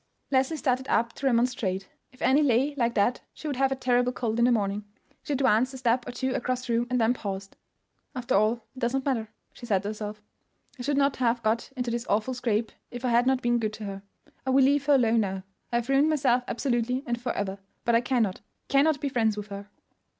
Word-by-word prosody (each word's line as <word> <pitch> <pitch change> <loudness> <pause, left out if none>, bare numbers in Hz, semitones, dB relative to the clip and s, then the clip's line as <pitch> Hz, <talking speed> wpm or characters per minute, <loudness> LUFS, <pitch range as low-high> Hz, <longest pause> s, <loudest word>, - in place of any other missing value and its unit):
Leslie 270 +4 +2
started 260 -2 0
up 235 +1 +1
to 275 - -2
remonstrate. 230 -6 0 0.2
If 255 - -10
Annie 265 +4 +4
lay 270 +1 +2
like 235 -3 0
that 220 +4 +2
she - - -12
would 285 -4 -2
have 270 0 +2
a - - +1
terrible 250 -1 +2
cold 235 -2 -2
in 235 - +5
the 250 - +4
morning. 205 -2 0 0.4
She 295 - -3
advanced 260 -1 +2
a - - -6
step 245 -1 +1
or - - -3
two 260 +1 -2
across 255 +1 -2
the 235 - -1
room, 235 +1 +1
and 250 0 +1
then 230 +1 +3
paused. 195 -4 -6 0.6
"After 250 -1 -2
all, 215 +3 +4 0.2
it - - -9
does 240 +2 0
not 270 - -1
matter," 230 -6 -1 0.2
she 240 - -10
said 195 -4 +1
to 205 - -2
herself. 210 -1 -6 0.6
"I - - -4
should 280 +3 0
not 280 -1 +2
have 240 -1 +1
got 220 +4 0
into 245 -1 -1
this 235 +1 -3
awful 215 +5 +1
scrape 230 -3 -1 0.2
if 245 +1 -6
I - - +2
had 240 +1 +3
not 265 -1 +2
been 240 0 +2
good 215 -2 -2
to 215 - -8
her. 195 -1 -5 0.4
I 265 - -3
will 265 +1 +5
leave 285 +1 +2
her 290 - +6
alone 230 -3 +3
now. 195 -3 -2 0.3
I - - -1
have 235 0 0
ruined 275 +3 +4
myself 260 -5 +2
absolutely 250 +1 -1
and 240 -1 -2
for 245 -1 -2
ever; 195 -1 -3 0.3
but 235 - +2
I 230 - +5
cannot—cannot 260 +5 0
be 290 - 0
friends 225 -5 +1
with 210 0 -6
her." 200 +1 -8
240 Hz, 235 wpm, -27 LUFS, 220-260 Hz, 0.6 s, her